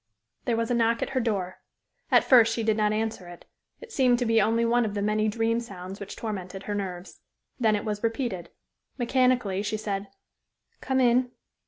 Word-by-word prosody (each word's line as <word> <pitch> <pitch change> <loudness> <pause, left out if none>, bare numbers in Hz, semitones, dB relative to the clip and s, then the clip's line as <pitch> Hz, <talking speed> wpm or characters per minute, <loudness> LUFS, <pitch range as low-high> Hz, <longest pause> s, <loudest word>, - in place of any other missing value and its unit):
There 235 -2 +1
was 230 +1 -1
a - - +3
knock 230 -1 +2
at - - -4
her 265 - 0
door. 195 -6 -2 0.5
At - - +5
first 235 -4 +5
she 230 - -2
did 220 -1 +2
not 210 -1 +2
answer 215 -4 -2
it. 175 0 -12 0.4
It 475 -1 -11
seemed 255 - +3
to 245 - -1
be 225 -1 +4
only 225 +3 +2
one 240 +1 +3
of 210 -2 -3
the 205 - -1
many 215 +1 +1
dream 225 +2 0
sounds 195 -4 -8
which 200 - -7
tormented 195 -3 -5
her 205 - -4
nerves. 185 -3 -5 0.4
Then 220 -3 +3
it 205 - -3
was 210 -1 -3
repeated. 230 -6 -2 0.5
Mechanically 245 -5 +1
she 210 +1 -2
said 200 -2 -3 0.7
"Come 265 -1 0
in." 250 0 +3
220 Hz, 195 wpm, -26 LUFS, 205-235 Hz, 0.7 s, At